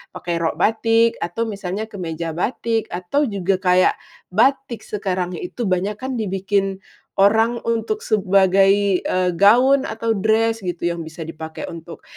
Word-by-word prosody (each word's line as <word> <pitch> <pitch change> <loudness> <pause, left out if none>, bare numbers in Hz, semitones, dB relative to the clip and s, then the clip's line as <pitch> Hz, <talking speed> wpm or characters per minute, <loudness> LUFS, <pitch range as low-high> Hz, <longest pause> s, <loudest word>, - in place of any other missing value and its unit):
pakai 170 -1 -3
rok 165 -1 -1
batik, 225 +1 +2
atau 175 +7 -2
misalnya 205 0 -5
kemeja 165 -4 -4
batik, 225 +5 -2
atau 185 +12 -1
juga 195 -2 -1
kayak 185 -1 +3 0.3
batik 250 +3 +1
sekarang 185 -3 -2
itu 245 - -4
banyak 190 +3 -1
kan 260 0 -4
dibikin 195 -2 -1 0.4
orang 225 +4 +3
untuk 230 - -2
sebagai, 195 -1 +3
eee, 185 -1 0
gaun 255 +7 +5
atau 225 +1 -2
dress 225 +2 +1
gitu 175 -4 -5
yang 170 - -5
bisa 160 0 -7
dipakai 160 0 -8
untuk 165 0 -10
200 Hz, 140 wpm, -20 LUFS, 180-225 Hz, 0.4 s, gaun